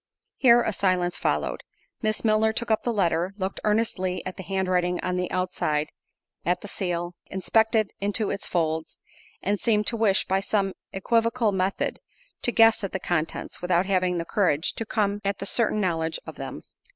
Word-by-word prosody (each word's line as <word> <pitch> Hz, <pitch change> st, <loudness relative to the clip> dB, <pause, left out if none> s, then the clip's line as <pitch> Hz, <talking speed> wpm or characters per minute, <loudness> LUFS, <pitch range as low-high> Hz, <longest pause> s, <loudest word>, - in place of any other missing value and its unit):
Here 240 Hz, -2 st, +6 dB
a 220 Hz, -, -1 dB
silence 180 Hz, -2 st, +1 dB
followed. -, -, -1 dB, 0.4 s
Miss 215 Hz, -1 st, -1 dB
Milner 220 Hz, 0 st, +3 dB
took 235 Hz, 0 st, -2 dB
up 220 Hz, -, +3 dB
the 240 Hz, -, -1 dB
letter—looked 190 Hz, 0 st, -1 dB
earnestly 210 Hz, -4 st, 0 dB
at 185 Hz, -, -5 dB
the -, -, -7 dB
handwriting 185 Hz, -1 st, 0 dB
on 180 Hz, 0 st, -1 dB
the 180 Hz, 0 st, -1 dB
outside—at 175 Hz, 0 st, -3 dB
the -, -, -8 dB
seal—inspected 190 Hz, +5 st, 0 dB
into 205 Hz, +1 st, 0 dB
its 200 Hz, -, -4 dB
folds—and 165 Hz, +4 st, -3 dB
seemed 210 Hz, -3 st, +2 dB
to 230 Hz, -, +2 dB
wish, 210 Hz, -3 st, +3 dB
by 190 Hz, +1 st, +1 dB
some 195 Hz, -1 st, 0 dB, 0.2 s
equivocal 230 Hz, +3 st, +1 dB
method, 190 Hz, 0 st, -1 dB, 0.4 s
to 240 Hz, -, +1 dB
guess 225 Hz, -1 st, +5 dB
at 195 Hz, -, -3 dB
the 190 Hz, -, -1 dB
contents, 165 Hz, -3 st, -2 dB
without 180 Hz, 0 st, +2 dB
having 185 Hz, -2 st, +1 dB
the 170 Hz, -, -2 dB
courage 170 Hz, -6 st, +1 dB
to 225 Hz, -, -5 dB
come 205 Hz, -2 st, 0 dB
at 200 Hz, 0 st, -1 dB
the 195 Hz, -, -5 dB
certain 215 Hz, 0 st, +1 dB
knowledge 165 Hz, -4 st, 0 dB
of -, -, -7 dB
them. -, -, -7 dB
195 Hz, 165 wpm, -26 LUFS, 180-215 Hz, 0.4 s, Here